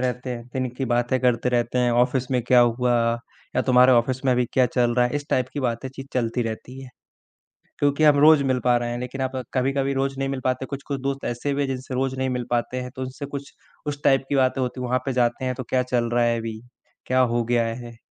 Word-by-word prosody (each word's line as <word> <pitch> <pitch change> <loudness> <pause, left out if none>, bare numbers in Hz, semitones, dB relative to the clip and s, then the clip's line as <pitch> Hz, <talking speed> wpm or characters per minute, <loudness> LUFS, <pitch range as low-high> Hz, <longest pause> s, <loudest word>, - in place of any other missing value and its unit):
रहते 125 0 -2
हैं, 120 -1 -5
दिन 130 -1 -1
की 135 - -2
बातें 120 +1 +1
करते 125 -1 +2
रहते 120 0 0
हैं, 125 -1 +3
ऑफ़िस 125 +2 +1
में 125 -1 +2
क्या 125 +1 +5
हुआ, 120 +1 +2 0.6
या - - +3
तुम्हारे 125 0 +5
ऑफिस 125 +2 +1
में 130 - +4
अभी 125 0 +2
क्या 130 -1 +4
चल 120 -1 +1
रहा 125 0 +3
है? 125 - -5
इस 145 -1 -5
टाइप 130 -1 +2
की 145 - -3
बातें 120 0 -2
चीत 135 0 -8
चलती 120 -1 0
रहती 120 +4 -6
है। 130 - -10 0.9
क्योंकि 145 +2 +2
हम 150 -1 +6
रोज़ 150 -1 +6
मिल 130 -1 +1
पा 125 -1 +4
रहे 120 0 -2
हैं 120 - -3
लेकिन 125 +2 -5
आप 130 0 -1 0.2
कभी-कभी 135 +1 0
रोज़ 135 0 -1
नहीं 135 0 -1
मिल 135 -1 -3
पाते, 130 +1 0
कुछ-कुछ 140 0 -5
दोस्त 135 0 -3
ऐसे 120 +4 -2
भी 145 - -1
हैं 140 - 0
जिनसे 130 0 -5
रोज़ 130 0 -1
नहीं 130 0 0
मिल 125 -1 -2
पाते 120 +1 -1
हैं, 125 - -6
तो 130 - -6
उनसे 130 +2 -5
कुछ 140 0 -7 0.3
उस 145 0 -4
टाइप 135 0 +4
की 145 - +1
बातें 130 0 +2
होती 125 0 -3
हैं, 125 - -3
वहाँ 130 +1 +1
पे 135 - -1
जाते 120 +1 +1
हैं 130 - 0
तो 130 - -5
क्या 130 -1 +2
चल 120 -2 0
रहा 120 0 +3
है 115 0 +2
अभी, 110 -1 -5 0.5
क्या 130 0 +2 0.2
हो 120 - +2
गया 120 0 +1
है? 120 -1 -10
130 Hz, 255 wpm, -23 LUFS, 120-135 Hz, 0.9 s, हम